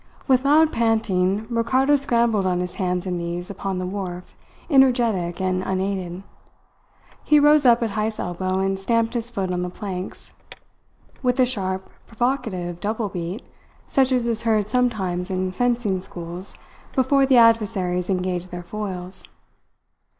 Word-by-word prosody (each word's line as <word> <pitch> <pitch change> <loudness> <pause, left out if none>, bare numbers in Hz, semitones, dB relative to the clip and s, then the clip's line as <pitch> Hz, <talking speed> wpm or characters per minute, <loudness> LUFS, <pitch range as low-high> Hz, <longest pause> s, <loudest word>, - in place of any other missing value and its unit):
With 260 -1 +3
loud 310 +2 +5
panting, 220 -3 +1
Ricardo 255 +5 +2
scrambled 235 -7 +1
on 180 -1 +1
his 180 0 -3
hands 180 0 -1
and 180 -2 -2
knees 170 +2 -4
upon 195 -1 -4
the 185 - -2
wharf, 180 -2 -6 0.3
energetic 240 - +3
and 185 -1 0
unaided. 190 -1 -3 1.0
He 300 - +5
rose 295 -1 +5
up 240 0 +5
at 225 - -1
Heyst's 215 +1 -2
elbow 185 +1 -2
and 195 0 0
stamped 230 +3 +1
his 235 -1 -2
foot 195 -6 -3
on 180 0 -1
the 180 - -2
planks, 185 0 -7 0.9
with 250 0 +1
a 255 - +6
sharp, 190 -6 -3 0.2
provocative, 225 -8 -2
double 215 +1 -2
beat, 180 +4 -5 0.4
such 265 -1 +2
as 250 -2 +2
is 230 -2 -1
heard 215 -3 +1
sometimes 195 -8 0
in 185 0 -1
fencing 235 -3 0
schools 175 0 -8 0.4
before 270 +1 +3
the 260 -2 +5
adversaries 205 -6 +3
engage 180 -1 -1
their 175 -1 -7
foils. 185 -1 -6
200 Hz, 145 wpm, -23 LUFS, 180-235 Hz, 1.0 s, a